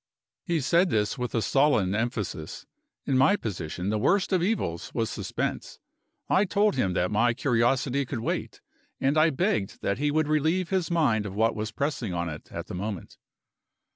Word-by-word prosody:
He 170 -4 0
said 170 +7 +3
this 105 -5 +1
with 125 0 -3
a 115 - +1
sullen 125 -6 +3
emphasis. 105 -8 -3 0.4
In 130 -1 +2
my 140 +9 +5
position, 90 - -4
the 110 - 0
worst 195 - +2
of 185 - +3
evils 175 - -1
was 115 -2 0
suspense. - - -4 0.5
I 190 - +3
told 205 +2 +2
him 95 -8 0
that 90 +3 0
my 115 +3 +2
curiosity 130 +2 +1
could 120 -4 -4
wait; - - -3 0.4
and 135 +2 +1
I 155 +1 +5
begged 110 -8 -1
that 100 - 0
he 145 +1 +1
would 155 +1 +1
relieve 160 +4 +1
his 190 -3 0
mind 125 -12 +2
of 95 - -7
what 110 +1 +2
was 110 0 -3
pressing 125 - -2
on 85 0 -2
it 75 - -9
at - - -5
the - - -9
moment. 100 0 -5
125 Hz, 180 wpm, -27 LUFS, 105-155 Hz, 0.5 s, my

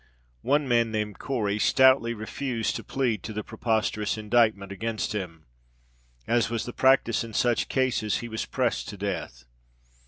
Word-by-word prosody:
One 145 - +1
man, 120 -2 +3
named 105 -2 -3
Cory, 110 -6 -1
stoutly 130 -1 +4
refused 115 +2 -3
to - - -5
plead 120 -7 -1
to 110 - -6
the 105 0 -4
preposterous 110 -2 -1
indictment 110 -2 +2
against 115 +2 -3
him. 85 -6 -5 0.8
As 120 -1 +2
was 115 -1 -2
the 120 - -6
practice 130 -4 +3
in 115 -2 -9
such 120 -2 +1
cases, 130 -5 +1
he 120 - -6
was 110 -1 -4
pressed 125 -3 -1
to 100 - -8
death. 95 -11 -4
115 Hz, 155 wpm, -26 LUFS, 105-120 Hz, 0.8 s, stoutly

